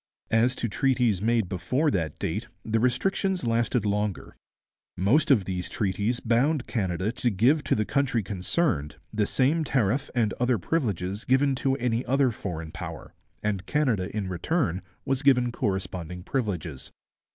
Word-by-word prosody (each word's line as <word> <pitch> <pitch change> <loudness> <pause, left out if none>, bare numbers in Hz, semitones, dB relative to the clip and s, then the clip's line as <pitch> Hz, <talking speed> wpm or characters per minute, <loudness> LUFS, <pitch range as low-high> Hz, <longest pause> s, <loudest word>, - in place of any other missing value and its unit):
As 120 +3 +3
to 120 - -2
treaties 120 -4 +1
made 115 -2 +2
before 115 - 0
that 80 - -1
date, 105 +8 -3 0.2
the 115 0 +1
restrictions 185 - 0
lasted 115 0 +1
longer. 105 -1 -2 0.6
Most 115 - +3
of 115 -9 +4
these 90 -2 -3
treaties 100 +5 -1
bound 125 +5 +1
Canada 95 -2 -1
to 125 0 0
give 125 +9 +3
to - - +2
the 110 - 0
country 135 -4 +1
concerned 95 - -1 0.2
the 105 -1 +1
same 150 +5 +2
tariff 130 -1 +1
and 110 -3 +2
other 125 -1 +2
privileges 100 - -2
given 135 +2 +3
to 135 +1 0
any 125 -2 0
other 135 -1 +3
foreign 80 -7 -5
power, 85 -3 -7 0.3
and 100 -2 -2
Canada 125 -11 +1
in 100 -3 -1
return 95 - -1 0.2
was 135 -1 0
given 125 -4 +4
corresponding 90 -4 -3
privileges. 90 - -3
115 Hz, 150 wpm, -27 LUFS, 95-130 Hz, 0.6 s, of